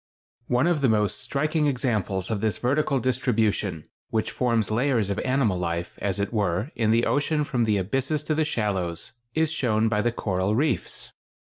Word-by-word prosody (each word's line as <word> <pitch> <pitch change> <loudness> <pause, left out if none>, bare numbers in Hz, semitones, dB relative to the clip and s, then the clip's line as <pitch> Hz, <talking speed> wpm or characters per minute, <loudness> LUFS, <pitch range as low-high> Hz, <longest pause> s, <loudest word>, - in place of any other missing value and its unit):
] - - -82
One 125 +2 +2
of 170 -4 +2
the 135 - +4
most 105 -2 +1
striking 155 +2 0
examples 110 -8 -1
of 105 -3 -1
this 110 -4 0
vertical 135 +2 +1
distribution, 110 - 0 0.2
which 110 -1 -1
forms 115 -4 0
layers 115 -3 +1
of 100 - -1
animal 130 -8 +1
life, 85 0 -3
as 100 -3 -1
it 100 +4 -2
were, 100 - 0
in 110 -2 +1
the 115 +1 +3
ocean 150 +1 +1
from 125 -5 0
the 105 -2 +2
abysses 135 - -1
to 155 - 0
the 155 +1 +2
shallows, 95 - -2 0.2
is 160 -1 +2
shown 115 -7 +1
by 105 -2 +1
the 120 - +1
coral 95 -2 -1
reefs. 140 0 -1
115 Hz, 185 wpm, -25 LUFS, 100-135 Hz, 0.2 s, the